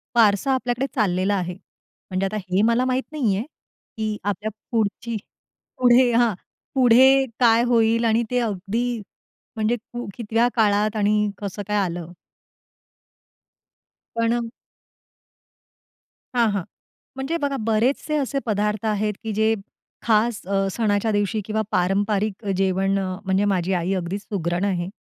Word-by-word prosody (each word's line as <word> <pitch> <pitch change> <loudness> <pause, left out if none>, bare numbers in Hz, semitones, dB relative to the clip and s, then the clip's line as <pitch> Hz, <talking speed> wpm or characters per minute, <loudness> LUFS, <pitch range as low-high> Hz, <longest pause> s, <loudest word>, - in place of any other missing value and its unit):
वारसा 225 +3 +4
आपल्याकडे 250 0 -1
चाललेला 195 -2 +1
आहे. 180 -1 -3 0.6
म्हणजे 185 +1 0
आता 215 +2 -2
हे 185 +2 +2
मला 235 +3 +3
माहित 255 +1 0
नाहीये, 230 -9 0 0.5
की 215 -1 -2
आपल्या 205 +2 -2 0.2
पुढची 225 +1 -1 0.6
पुढे 245 0 +5
हां, 235 -2 +3 0.4
पुढे 265 +2 +6
काय 235 -1 +5
होईल 230 -1 +3
आणि 230 +1 +3
ते 250 - +2
अगदी, 225 +2 -2 0.5
म्हणजे 220 +2 +1 0.4
कितव्या 230 +1 +1
काळात 210 -1 +2
आणि 210 0 +2
कसं 205 0 -5
काय 210 - 0
आलं? 175 -1 -5 2.0
पण 230 0 0 1.9
हां, 235 -2 +4
हां, 200 -3 -1 0.5
म्हणजे 270 +6 -2
बघा, 280 -1 0
बरेचसे 255 +7 +1
असे 275 -1 -1
पदार्थ 210 0 -1
आहेत, 210 0 0
की 220 - -3
जे 220 +1 +2 0.5
खास, 225 0 +2
अ, 195 0 +1
सणाच्या 215 0 +1
दिवशी 205 +1 0
किंवा 220 0 -1
पारंपरिक 200 +3 0
जेवण, 195 +1 +1
म्हणजे 190 +1 -1
माझी 190 -2 +1
आई 180 +3 -1
अगदीच 185 +2 -3
सुगरण 175 -2 -2
आहे. 180 -3 -1
215 Hz, 125 wpm, -23 LUFS, 195-235 Hz, 2.0 s, पुढे